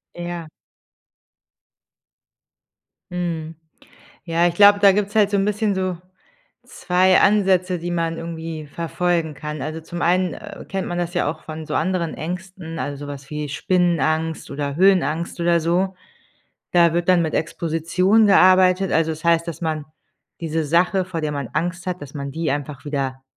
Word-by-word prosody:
Ja. 175 -2 -6 2.6
Mhm. 165 -3 -3 0.7
Ja, 170 0 +2
ich 175 - -1
glaube, 205 +1 +7
da 200 -1 +7
gibt's 205 +1 -1
halt 210 -2 +4
so 200 - +2
'n 195 - +2
bisschen 210 0 0
so 185 -2 -2 0.7
2 185 +1 +2
Ansätze, 190 -3 +3
die 175 +1 -4
man 165 -1 -1
irgendwie 160 -2 -6
verfolgen 165 +1 -1
kann. 150 0 -6
Also, 155 +3 -5
zum 170 +1 -7
einen, 180 0 +2
äh, 205 -1 -10
kennt 195 -1 -3
man 175 - -3
das 175 0 -3
ja 175 - +1
auch 155 - -12
von 155 0 -7
so - - -4
anderen 170 -1 0
Ängsten, 175 -1 -6
also, 145 0 -3
so - - -8
was 140 -1 -8
wie 150 -1 -4
Spinnenangst 160 +1 0
oder 140 0 -3
Höhenangst 175 -2 +2
oder 170 0 +3
so. 180 +4 0 0.8
Da 170 -2 +5
wird 175 +1 -1
dann 180 -2 +5
mit 160 -1 -2
Exposition 170 +7 +1
gearbeitet. 185 -1 +5
Also, 160 0 +2
es 155 - -9
heißt, 170 0 +3
dass 165 -2 -6
man 155 -2 -2 0.6
diese 160 -1 -1
Sache, 180 +5 +2
vor 180 -3 -5
der 155 -1 -2
man 140 -4 -4
Angst 175 +3 -2
hat, 180 -1 -3
dass 140 -2 -10
man 140 -1 -5
die 160 0 -2
einfach 145 0 -4
wieder 135 -3 -3
170 Hz, 165 wpm, -21 LUFS, 155-185 Hz, 2.6 s, glaube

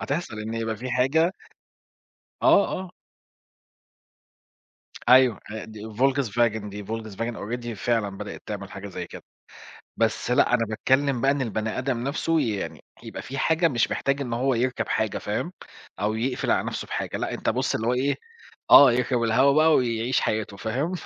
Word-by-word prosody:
هتحصَل 140 -7 -3
إنّه 110 +1 -4
يبقى 110 -1 -2
في 125 +3 -6
حاجة 140 +8 +2 1.1
آه، 200 - +6
آه. 185 -1 -8 2.2
أيوه 125 -3 +6
أ 110 0 -6
دي 110 -1 -11
Volkswagen 120 -4 +1
دي 100 0 -7
Volkswagen 110 +1 -4
already 120 +3 -5
فعلًا 115 0 0
بدئت 105 - -7
تعمل 100 -2 -6
حاجة 95 +1 -8
زي 90 -2 -6
كده، - - -11 0.7
بس 115 +1 0
لأ، 125 0 +3
أنا 115 - +2
باتكلّم 130 +4 +1
بقى 135 - +3
إن 140 -1 0
البني 110 -1 -2
آدم 130 -2 -1
نفسه 160 +3 0
يعني 110 -7 -3 0.2
يبقى - - -7
في 135 +2 -6
حاجة 165 +3 +3
مش 120 -5 +1
محتاج 140 +1 0
إن 125 -4 -4
هو 130 +2 +1
يركَب 125 +2 -1
حاجة - - 0
فاهم، - - -3 0.5
أو 105 +1 0
يقفِل 125 +3 -1
على - - +2
نفسه - - -4
بحاجة - - -3
لأ، - - -3
أنت - - -1
بُصّ - - -1
اللي 110 - -2
هو 125 - +2
إيه، 140 +3 0 0.5
آه 140 -3 +10
يركَب 125 0 0
الهوا 130 +5 +4
بقى 155 +1 +5
ويعيش 120 0 +1
حياته 110 -2 -2
فاهم. 125 - -2
120 Hz, 165 wpm, -25 LUFS, 110-135 Hz, 2.2 s, آه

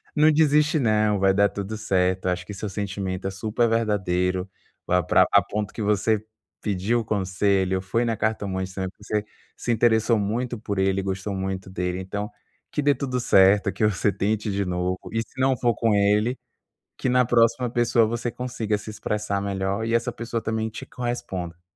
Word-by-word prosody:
Não 155 +1 +5
desiste 150 +1 +3
não, 105 -4 +2
vai 95 0 +4
dar 100 +1 +4
tudo 100 +2 -5
certo, 95 -3 0
acho 90 0 -1
que 105 - -7
seu 100 +2 -5
sentimento 95 -2 -3
é - - -2
super 110 +4 0
verdadeiro, 95 -4 0 0.4
vai 90 -1 +2
pra - - +4
a - - +7
ponto 105 0 -4
que 110 - -5
você 105 +1 +1 0.4
pediu 105 +3 0
conselho, 95 -2 +1
foi 115 +6 0
na 115 -1 0
cartomante 95 -4 -2
também, 95 -1 -2 0.7
se 120 - -2
interessou 115 0 +3
muito 120 +4 -2
por 100 -3 -3
ele, 95 0 +2
gostou 95 +1 -3
muito 95 0 -4
dele 90 0 -2
então, 105 +3 -4 0.4
que 150 - -1
dê 145 -1 +3
tudo 125 -1 -2
certo, 100 -2 +4
que 105 - +1
você 105 0 +1
tente 105 +2 -1
de 100 0 -1
novo 90 +1 -1 0.2
e 115 - +1
se 130 +3 -11
não 130 0 +3
for 120 -1 +1
com 115 0 +1
ele, 105 +5 +2 0.6
que - - -1
na 125 0 +4
próxima 120 +1 +3
pessoa 120 -1 +3
você 120 +1 -2
consiga 120 -4 -2
se 110 - -8
expressar 105 -1 -2
melhor 100 +2 -2
e 115 - 0
essa 115 +1 +1
pessoa 115 0 -4
também 110 0 -1
te - - -8
corresponda. 95 -8 -5
105 Hz, 180 wpm, -24 LUFS, 95-115 Hz, 0.7 s, a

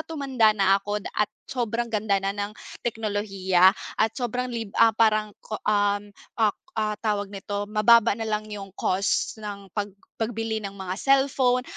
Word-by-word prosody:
tumanda 270 -8 +2
na 195 0 +4
ako 205 +1 -3 0.2
at 210 - +1 0.2
sobrang 235 -1 -2
ganda 205 -2 +1
na 195 0 -1
ng 205 +1 -4 0.3
teknolohiya 200 -5 +2 0.3
at 220 0 +4
sobrang 250 0 -2
lib 225 -4 -5
ah, 225 -1 +6
parang 215 -2 +2
ko, 215 - -5
um, 205 0 +1 0.3
ak 210 -2 +3 0.2
ah, 215 -1 0
tawag 210 -2 0
nito, 200 +1 -4
mababa 215 0 +5
na 225 - -4
lang 215 0 -2
'yung 200 -2 -7
cost 195 +3 0
ng 200 -2 -7
pag 205 -1 -2 0.3
pagbili 225 -1 -2
ng 200 -2 -6
mga 190 0 -5
cellphone, 270 -2 +3
210 Hz, 160 wpm, -25 LUFS, 200-225 Hz, 0.3 s, ah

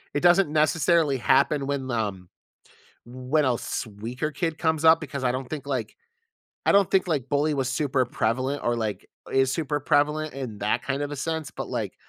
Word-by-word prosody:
It - - +2
doesn't 175 -1 +5
necessarily 155 -1 +3
happen 140 +4 +2
when, 140 -2 -2
um, 100 -6 -3 0.8
when 130 +5 0
a 125 - +2
s 120 - -4
weaker 115 +8 -5
kid 160 +2 -2
comes 160 -2 0
up 160 0 +7
because 140 -3 -6
I 125 - +3
don't 130 0 -4
think, 145 -3 -5
like, 130 -5 -3 0.7
I - - +5
don't 200 -2 +4
think, 190 -1 +2
like, 145 -7 -1
bully 145 +2 +2
was 135 -2 -1
super 130 -1 +1
prevalent 130 +5 -1
or, 120 0 +1
like, 110 -3 -3 0.3
is 135 0 +3
super 145 -2 -1
prevalent 150 +1 +1
in 125 -6 -6
that 105 +1 0
kind 140 +1 -2
of 145 - -3
a - - -4
sense, 160 +1 -3
but, - - -6
like, - - -3
140 Hz, 195 wpm, -25 LUFS, 125-155 Hz, 0.8 s, up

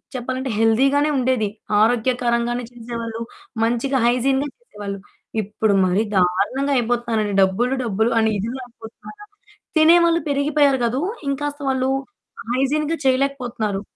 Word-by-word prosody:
చెప్పాలంటే 255 +1 -3
హెల్దీ‌గానే 275 +7 +3
ఉండేది. 250 -4 +1 0.3
ఆరోగ్యకరంగానే 240 +1 +1
చేసేవాళ్ళు 230 -1 -6 0.4
మంచిగా 245 +3 +1
హైజీన్‌గా 265 +4 +1
చేసేవాళ్ళు. 205 - -8 0.4
ఇప్పుడు 210 +1 0
మరి 185 +4 +2
దారుణంగా 205 +10 +1
అయిపోతున్నారండి 230 -3 0
డబ్బులు, 230 +7 +2
డబ్బులు, 220 +1 0
అని 220 0 +3
ఇదిగా 235 +6 -4
అయిపోతున్నారు. 235 - -13 0.5
తినేవాళ్ళు 335 +1 +5
పెరిగిపోయారు 280 -1 +2
కాదు, 250 +5 -1 0.3
ఇంకాస్త 290 +1 -3
వాళ్ళు 260 0 0 0.6
హైజీన్‌గా 300 +5 0
చేయలేకపోతున్నారు. 250 -6 0
245 Hz, 105 wpm, -21 LUFS, 225-275 Hz, 0.6 s, తినేవాళ్ళు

